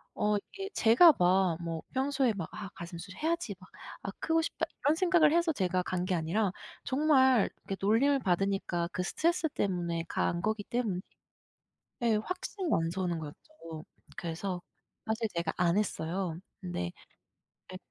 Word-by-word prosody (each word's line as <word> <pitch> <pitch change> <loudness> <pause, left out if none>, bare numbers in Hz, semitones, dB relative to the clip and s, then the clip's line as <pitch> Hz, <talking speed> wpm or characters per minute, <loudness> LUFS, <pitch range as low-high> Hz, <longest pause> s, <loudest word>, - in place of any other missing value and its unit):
어 210 0 +2
이게 390 - -7
제가 255 +9 +7
막 180 -1 +4
뭐 165 -1 -3
평소에 265 -2 +2
막 185 -6 -5
'아 205 -2 -6
가슴 170 0 -7
수술해야지.' 215 - -2
막 185 - -16 0.3
'아 200 - -3
크고 325 0 +2
싶다.' 325 - -2 0.2
이런 295 +2 +5
생각을 340 -3 +4
해서 340 0 +3
제가 185 -4 0
간 180 0 -2
게 185 - 0
아니라 180 +5 +1 0.3
정말 265 -5 +4 0.2
이렇게 195 - -3
놀림을 245 +8 +4
받으니까 195 -4 0
그 180 - -1
스트레스 325 - +1
때문에 175 -7 -1
간 170 - 0
거기 215 +1 -1
때문에 225 -7 -1 1.0
예 230 -2 +4
확신이 365 - -4
안 165 0 +2
서는 175 -2 -1
거였죠. 160 - -10 0.3
그래서 175 +2 -3 0.4
사실 225 +1 0
제가 170 -1 -1
안 175 +1 +3
했어요. 180 -4 -1 0.2
근데 90 - -3 0.8
예 - - -5
200 Hz, 300 characters per minute, -31 LUFS, 175-270 Hz, 1.0 s, 제가